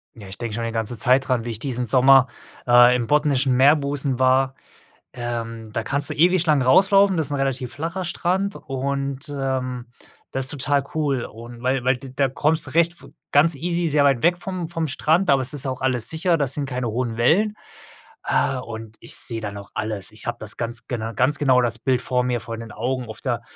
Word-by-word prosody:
Ja, 105 -3 -11
ich 95 - -6
denke 115 -2 -5
schon 115 - -3
eine 115 -1 -3
ganze 115 +1 -1
Zeit 130 +1 +3
dran, 120 -3 0
wie 120 - -3
ich 110 - -5
diesen 125 -1 -2
Sommer, 130 +2 +5 0.4
äh, 120 0 +7
im 120 -2 -1
botnischen 140 -3 +2
Meerbusen 140 -1 +2
war. 130 +1 +3 0.6
Ähm, 115 -2 -5
da 115 +2 -2
kannst 140 +4 -1
du - - -2
ewig 180 +2 +3
lang 150 -4 +3
rauslaufen, 195 +8 +5
das 160 -4 -1
ist - - -9
'n - - 0
relativ 130 -2 -2
flacher 170 +6 -4
Strand 185 +3 -1
und, 140 +1 -3
ähm, 130 -3 -3 0.5
das 135 0 -1
ist 130 - -6
total 145 -1 0
cool 140 -5 0
und 120 +2 -10
weil 130 0 0
weil 130 +1 +3
d 130 +1 -11
da 135 +1 +2
kommst 150 +4 0
du - - -8
recht 170 +3 +2 0.4
ganz 150 +3 +4
easy 170 +3 -1
sehr 145 -1 +3
weit 135 -4 +3
weg 175 +1 +3
vom 180 -1 -5
vom 165 -1 -3
Strand, 160 +6 +1
aber 135 -1 +4
es 130 +2 0
ist 145 -2 -1
ja 135 - -2
auch 130 - -6
alles 125 -3 +1
sicher, 165 +1 +1
da 145 - +1
sind 140 +2 -2
keine 125 -2 -3
hohen 115 0 -2
Wellen. 175 - +2 0.7
Äh, 135 - +1
und 110 -3 -8
ich - - -9
sehe 115 -1 -1
da 105 -2 -5
noch 100 0 -10
alles. 105 -2 -4
Ich 110 +1 -9
habe 120 0 -2
das 105 -1 -6
ganz 120 0 -4
gena 115 -2 -3
ganz 135 +5 +1
genau 130 -3 +4
das 120 -1 -1
Bild 125 +1 0
vor 125 +1 0
mir, 125 -1 -1
vor 115 +1 -6
den 115 -2 -9
Augen. 125 +2 -3
Auf 110 - -8
der 120 -3 -2
130 Hz, 220 wpm, -22 LUFS, 120-145 Hz, 0.7 s, äh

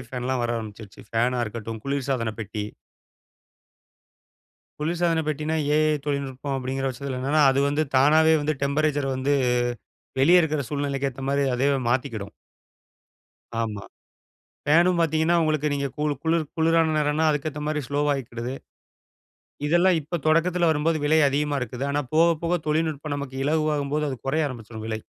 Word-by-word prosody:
ஃபேன்லாம் 125 0 -2
வர 120 - -1
ஆரம்பிச்சிருச்சு. 110 +1 -9
ஃபேனா 120 +2 +1
இருக்கட்டும், 110 0 -6
குளிர்சாதனப்பெட்டி. 115 -6 -2 2.2
குளிர்சாதன 165 +1 +1
பெட்டின்னா, 155 +1 -1 0.2
ஏ. - - +4 0.2
ஐ. - - 0
தொழில்நுட்பம் 140 -1 -3
அப்பிடிங்கிற 135 +1 -3
பட்சத்தில 130 0 -4
என்னன்னா, 145 +4 +2
அது 135 - 0
வந்து 145 +2 +1
தானாவே 155 +4 +5
வந்து 155 +1 0
டெம்பரேச்சர 145 0 +1
வந்து, 140 +2 +1 0.9
வெளிய 175 +5 +6
இருக்கிற 155 -2 0
சூழ்நிலைக்கு 140 -1 -1
ஏத்தமாரி 135 +2 -1
அதுவே 135 +2 +2
மாத்திக்கிடும். 120 -5 -2 1.3
ஆமா. 105 -3 -3 0.8
ஃபேனும் 170 +4 +4
பார்த்தீங்கன்னா, 160 +1 +2
உங்களுக்கு 155 -2 +1
நீங்க 140 0 -1
கூளு 150 0 0
குளிர் 160 0 +1
குளிரான 165 0 +3
நேரன்னா, 150 +1 +1
அதுக்கேத்தமாரி 150 +1 -2
ஸ்லோவா 145 +1 +1
ஆகிக்கிடுது. 125 -2 -5 1.1
இதெல்லாம் 175 +2 +4
இப்ப 165 +4 -4
தொடக்கத்தில 170 +2 +3
வரும்போது, 160 +1 +1
விலை 155 +2 +4
அதிகமா 145 +1 0
இருக்குது. 125 +2 -4
ஆனா, 145 +1 0
போக 165 +2 +6
போக 175 +1 +1
தொழில்நுட்பம் 155 -1 -1
நமக்கு 135 -2 -6
இலகுவாகும்போது, 150 -1 0
அது 130 - -4
கொறைய 150 +2 +1
ஆரம்பிச்சிரும் 110 -2 -8
விலை. 110 0 -3
145 Hz, 130 wpm, -24 LUFS, 130-155 Hz, 2.2 s, வெளிய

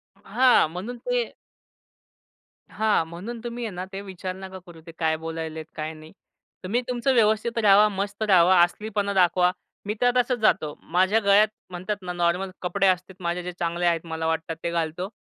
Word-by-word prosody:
हां. 255 -9 +3
म्हणून 215 +8 -6
ते - - -1 1.4
हां. 215 -6 +1
म्हणून 200 +8 -7
तुम्ही 240 0 -5
आहे 215 - -4
ना 180 +1 -4
ते 195 - -4
विचार 185 -1 -6
नका 190 0 -9
करू 165 -2 -13
ते - - -8
काय 160 -1 +2
बोलत 165 0 -6
आहेत, 160 -1 -5
काय 155 +1 -4
नाही? 155 0 -13 0.5
तुम्ही 230 +7 0
तुमचं 250 +2 0
व्यवस्थित 220 0 +2
राहावा 205 +1 +6
मस्त 200 +2 -3
रहावा 185 -3 +5
असलीपणा 200 +3 0
दाखवा. 180 -1 +3 0.3
मी 210 - -1
तर 245 0 +5
तसच 250 0 +2
जातो 155 -8 +2 0.2
माझ्या 190 +5 +3
गळ्यात 205 +2 +6 0.2
म्हणतात 185 +3 -4
ना 180 -1 -5
नॉर्मल 175 +2 0
कपडे 195 +2 +1
असते 185 0 0
माझे 175 0 -2
जे 180 - -4
चांगले 170 +1 -1
आहेत 170 -1 +1
मला 160 0 -3
वाटतात 160 0 -2
ते 170 - -1
घालतो. 170 +2 -2
185 Hz, 180 wpm, -25 LUFS, 170-215 Hz, 1.4 s, राहावा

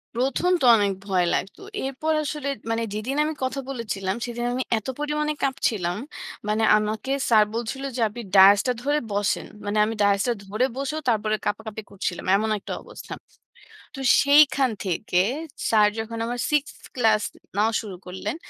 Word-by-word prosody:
১ম 270 +9 +1
তো - - +3
অনেক 205 -2 +2 0.2
ভয় 185 -3 +2
লাগতো। 195 - -3 0.2
এরপর 275 +4 -1
আসলে 295 -1 -4 0.2
মানে 225 0 0
যেদিন 215 +6 -3
আমি 310 +1 -1
কথা 260 +2 -1
বলেছিলাম, 200 -7 -3
সেদিন 240 0 -4
আমি 255 +1 -1
এত 215 - -6
পরিমাণে 300 0 -1
কাঁপছিলাম। 210 -9 0 0.5
মানে 215 +1 +1
আমাকে 215 +5 -2 0.2
স্যার 220 -2 +6
বলছিল 240 +4 -3
যে, 245 - -2
আপনি 240 +3 -8
ডায়েসটা 200 +5 +7
ধরে 290 +3 +1
বসেন। 205 0 0 0.2
মানে 205 +1 -1
আমি 225 - -2
ডায়েসটা 200 +4 +3
ধরে 215 +6 0
বসেও, 280 +3 -2
তারপরে 215 -1 +1
কাঁপাকাঁপি 220 +1 -3
করছিলাম। 185 -3 -4
এমন 220 +2 +1
একটা - - -6
অবস্থা। - - -9 0.8
তো - - -8 0.2
সেইখান 280 -2 +5
থেকে 180 0 -1 0.5
স্যার 215 -2 +5
যখন 230 +1 -5
আমার 245 +1 -3
সিক্সথ 300 +2 -1
ক্লাস 220 -4 +3 0.4
নেওয়া 220 +2 +2
শুরু 205 -4 -8
করলেন, 190 +5 -4
225 Hz, 155 wpm, -24 LUFS, 205-270 Hz, 0.8 s, ডায়েসটা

